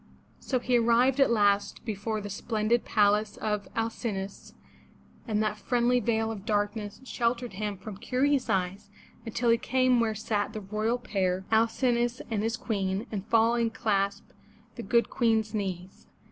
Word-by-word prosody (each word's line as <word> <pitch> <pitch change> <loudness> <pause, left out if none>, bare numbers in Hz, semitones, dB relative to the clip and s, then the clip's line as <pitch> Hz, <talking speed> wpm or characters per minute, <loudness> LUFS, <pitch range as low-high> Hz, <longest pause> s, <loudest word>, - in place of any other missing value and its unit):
So 260 - -1
he 245 0 +2
arrived 240 +3 +3
at 275 - +5
last 205 -1 +2
before 215 0 -3
the 205 - -6
splendid 220 +3 0
palace 210 0 +2
of 210 -1 -2
Al 225 0 0
cin'o 210 -5 -3
us, 200 - -14 0.7
and 215 -1 +1
that 215 0 -2
friendly 245 +4 +2
veil 225 -1 0
of 205 -3 -7
darkness 205 0 -2
sheltered 240 -1 -1
him 205 +1 -3
from 200 +1 -8
curious 260 +4 +1
eyes, 190 +1 -1 0.4
until 230 +1 +1
he 230 - +3
came 255 -1 +2
where 225 -2 +1
sat 210 -1 -2
the 215 - -5
royal 215 +4 -1
pair, 190 -5 -1
Al 225 +1 +5
cin'o 240 0 +1
us 240 +1 -2
and 215 -2 0
his 225 +1 -1
Queen, 195 -2 -2
and 205 -1 -4
falling, 230 +1 +3
clasped 200 -3 -1 0.4
the - - -7
good 235 -1 +1
Queen's 225 -3 +1
knees. 190 -3 -5
220 Hz, 165 wpm, -28 LUFS, 205-235 Hz, 0.7 s, at